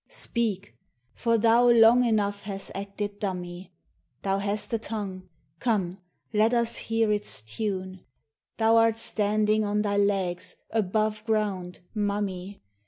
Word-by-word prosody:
Speak! 225 - -2 0.4
for 230 -1 +1
thou 230 +2 +5
long 235 +1 +7
enough 205 -3 +1
hast 195 -1 -5
acted 200 +1 -5
dummy; 180 -2 -5 0.5
Thou 195 0 0
hast 205 +2 -1
a 230 - +1
tongue, 200 -5 -6
— - - -42
come, 195 -6 -1 0.3
Let 220 +3 +3
us 235 -1 +2
hear 225 -1 +1
its 205 - -1
tune; 185 - -4 0.5
Thou 225 0 +4
'rt 225 -1 +2
standing 215 0 +2
on 210 0 0
thy 205 -1 0
legs, 195 -3 0 0.2
above 215 0 0
ground, 200 -5 -1
mum 205 -1 0
my! 190 +1 -7
205 Hz, 135 wpm, -27 LUFS, 195-225 Hz, 0.5 s, long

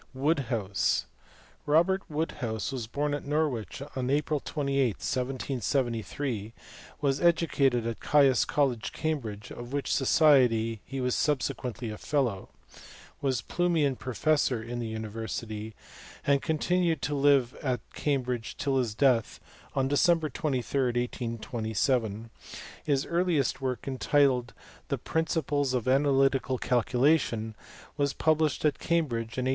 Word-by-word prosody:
Woodhouse. 130 - 0 0.6
Robert 175 +6 +3
Woodhouse 125 -8 -3
was 125 -4 -4
born 145 +5 -1
at 145 - -3
Norwich 140 -4 -1
on 130 -1 -2
April 150 +1 +1
28, 140 -2 0
1773; 125 -3 -2 0.5
was 140 -1 +1
educated 145 -8 +2
at 115 -1 -3
Caius 140 -4 +4
College, 130 -6 0
Cambridge, 115 -10 -3
of 120 +2 -8
which 140 -1 -1
society 125 -7 +4
he 135 - -5
was 125 -1 0
subsequently 125 -5 -1
a 105 - -8
fellow; 125 -10 -1 0.7
was 130 -4 0
Plumian 165 -6 +1
pro 130 0 -6
fessor 145 -6 +2
in 120 +1 -5
the 115 - -3
university; 110 0 -5 0.5
and 140 -1 +3
continued 165 0 0
to 145 - -1
live 140 -3 +3
at 125 -5 -1
Cambridge 125 -5 -2
till 140 -4 0
his 115 -4 -1
death 125 -4 +2 0.4
on 135 -1 +2
December 160 +3 +3
23, 135 -2 -1
1827. 115 -2 -1 0.5
His 140 -2 +1
earliest 170 -6 0
work, 130 -2 -3
entitled 130 -2 +2 0.3
the 140 - -1
Principles 145 -2 0
of 125 -1 -2
Analytical 135 -1 +3
Calculation, 125 -2 +1 0.4
was 140 -1 +1
published 155 -2 +1
at 150 - +2
Cambridge 125 -10 -1
in 130 - -1
1803. - - +1
135 Hz, 120 wpm, -28 LUFS, 120-145 Hz, 0.7 s, Caius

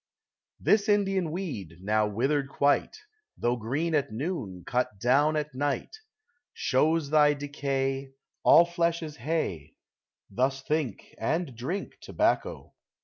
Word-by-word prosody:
This 210 0 +3
Indian 195 -4 +2
weed, 140 - -5
now 105 +3 +1
withered 135 +7 0
quite, 140 - +1 0.4
Though 120 +1 +1
green 140 +9 -2
at 145 -2 +1
noon, 110 - -4
cut 125 -4 -1
down 140 +7 +3
at 150 -1 -2
night, 145 - -2 0.6
Shows 150 +2 +1
thy 150 -1 +5
decay, 135 -1 -2
— - - -56
All 170 - +7
flesh 170 -1 0
is 150 -2 -7
hay: 115 - -3 0.5
Thus 130 +5 -1
think, 150 -7 -2
and 155 +3 -1
drink 150 - -5
* - - -54
tobacco. - - -1
140 Hz, 130 wpm, -28 LUFS, 125-160 Hz, 0.6 s, All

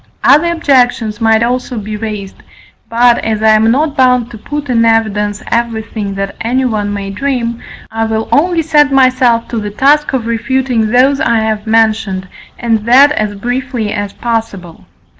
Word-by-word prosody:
Other 320 +5 +4
objections 245 -9 +1
might 225 0 +3
also 250 0 -2
be 215 0 -5
raised, 210 -3 -6 0.5
but, 240 +1 +3
as 220 -1 -2
I 220 - +5
am 215 +1 +4
not 290 +4 0
bound 250 -3 +2
to 225 - -9
put 290 +5 -5
in 235 -3 +1
evidence 215 -2 0
everything 220 -3 -3
that 195 0 -4
anyone 230 -4 -1
may 200 -1 -5
dream, 235 0 -3 0.3
I 225 0 -1
will 220 0 -2
only 335 +2 +2
set 295 -2 +3
myself 255 -3 +2
to 230 - -3
the 210 -1 -4
task 285 +8 +2
of 250 -4 -1
refuting 235 0 -1
those 260 +4 +3
I 235 -7 +1
have 220 -1 -2
mentioned, 220 -4 +1 0.3
and 230 -2 0
that 270 +4 +6
as 215 -7 -2
briefly 245 0 -3
as 205 -2 -4
possible. 220 -8 -5
230 Hz, 160 wpm, -13 LUFS, 215-255 Hz, 0.5 s, that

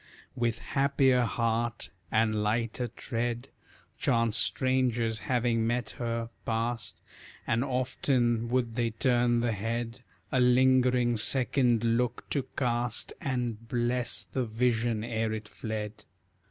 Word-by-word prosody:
With 120 -2 0
happier 135 0 +2
heart, 115 0 -1 0.2
and 110 -1 +2
lighter 115 +3 0
tread, 120 +1 -3 0.5
Chance 115 -2 +2
strangers, 120 -3 +1
having 120 -2 +1
met 120 +1 -1
her, 115 -1 -2
past, 115 0 -2 0.5
And 115 +2 +1
often 125 -3 0
would 120 -2 0
they 120 0 0
turn 120 +1 +2
the 120 -1 +1
head 115 +3 -3 0.3
A 130 - +2
lingering 125 -1 +4
second 120 0 +2
look 120 +1 0
to 135 -3 0
cast, 120 -2 -1
And 120 -4 -2
bless 120 0 0
the 130 - -2
vision 115 -1 0
ere 115 -1 -1
it 110 -1 -5
fled. 105 -1 -5
120 Hz, 115 wpm, -29 LUFS, 115-125 Hz, 0.5 s, lingering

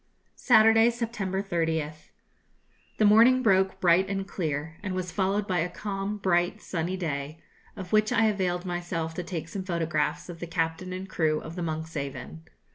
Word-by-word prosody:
Saturday, 225 -1 +6
September 215 -5 -3
30th. 160 -4 -2 0.9
The 215 - +3
morning 235 +5 +6
broke 190 -3 +3
bright 180 +2 +4
and 195 -1 -2
clear, 160 -3 -3
and 190 -2 -3
was 180 -1 -3
followed 200 +2 0
by 180 -2 +1
a 170 +2 0
calm, 200 +2 -4
bright, 180 +1 +1
sunny 180 0 -3
day, 150 -3 -4 0.4
of 185 0 -8
which 215 0 +3
I 225 - +3
availed 185 -4 0
myself 175 -2 -3
to 180 - -4
take 165 -3 -5
some 190 +3 -5
photographs 165 -4 -1
of 175 -2 -9
the 170 - -5
captain 165 +2 -2
and 185 +1 -5
crew 155 -4 0
of 160 - -8
the 180 - -4
'Monkshaven.' 145 - -5
180 Hz, 165 wpm, -27 LUFS, 165-195 Hz, 0.9 s, Saturday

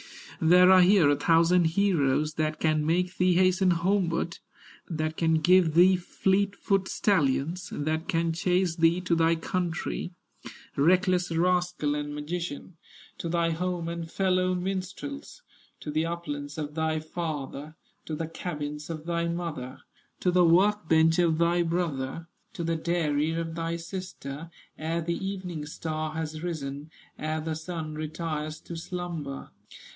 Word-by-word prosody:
There 180 +3 +7
are 185 -1 +8
here 180 -3 +6
a - - +3
thousand 170 +3 +4
heroes 160 -5 +2
That 155 0 -1
can 155 -1 +2
make 180 +3 0
thee 180 -1 +3
hasten 185 +1 +4
homeward, 175 -1 0 0.5
That 155 -1 -2
can 160 0 +2
give 165 0 +4
thee 185 +2 +7
fleet 195 +2 0
foot 195 -1 0
stallions, 170 -1 +1
That 155 +2 -2
can 165 -3 +1
chase 180 0 +1
thee 165 +1 +4
to 180 -1 0
thy 165 0 +3
country, 175 +1 -3 0.6
Reckless 180 +4 +3
rascal 175 -2 +1
and 145 0 -3
magician, 165 +2 -5 0.4
To 170 - -3
thy 170 0 +1
home 175 0 -2
and 170 -1 -5
fellow 185 0 +1
minstrels, 195 - -5 0.4
To 150 - -5
the 155 +2 0
uplands 145 -4 -5
of 150 -1 -4
thy 160 0 0
father, 155 -2 -5 0.3
To 155 - -4
the 160 +1 -3
cabins 150 -3 -5
of 160 -1 -6
thy 170 0 -1
mother, 165 -7 -4 0.4
To 180 - +2
the 180 0 +4
work 185 +2 +3
bench 160 +1 +4
of 165 -3 +3
thy 170 +1 +3
brother, 165 -4 -2 0.3
To 170 - -4
the 165 0 0
dairy 160 -2 0
of 165 0 -3
thy 165 0 -2
sister, 165 -4 -7 0.3
Ere 165 +2 -1
the 170 +3 -3
evening 180 -6 -4
star 155 0 -4
has 155 -1 -4
risen, 150 -3 -5 0.3
Ere 155 +1 -2
the 160 0 -3
sun 160 -1 -5
retires 155 0 -4
to 170 - -8
slumber." 165 -5 -5
165 Hz, 145 wpm, -27 LUFS, 155-180 Hz, 0.6 s, are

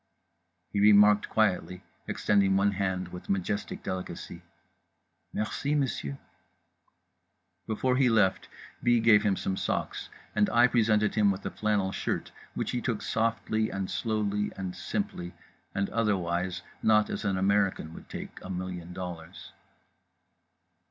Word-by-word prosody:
He 100 - +1
remarked 105 0 +6
quietly, 95 -3 0 0.2
extending 100 -2 +2
one 100 +1 +3
hand 95 -2 -2
with 90 0 -10
majestic 100 +2 -2
delicacy: 95 -1 -5 0.9
"Merci, 120 +7 -1
monsieur."… 115 - -1 1.5
Before 125 +4 +1
he 130 -2 +4
left, 105 -5 +2 0.3
B. 120 -1 +4
gave 110 -2 +6
him 100 -2 +2
some 95 - -2
socks - - -3 0.3
and 105 -1 +3
I 120 +1 +5
presented 110 -3 +3
him 105 -2 +4
with 95 -1 -2
a - - -2
flannel 105 -3 0
shirt, - - -3 0.2
which - - -2
he 120 - -2
took 115 -4 -2
softly 110 -1 0
and 95 -1 -4
slowly 105 -2 -1
and 95 -2 -4
simply 90 0 -4 0.4
and 100 0 +1
otherwise 90 -5 0 0.2
not 105 -1 +4
as - - -3
an 100 -2 0
American 95 -4 +1
would - - -12
take - - -7
a 90 - -9
million 90 -1 -5
dollars. 90 -3 -7
100 Hz, 130 wpm, -29 LUFS, 95-110 Hz, 1.5 s, remarked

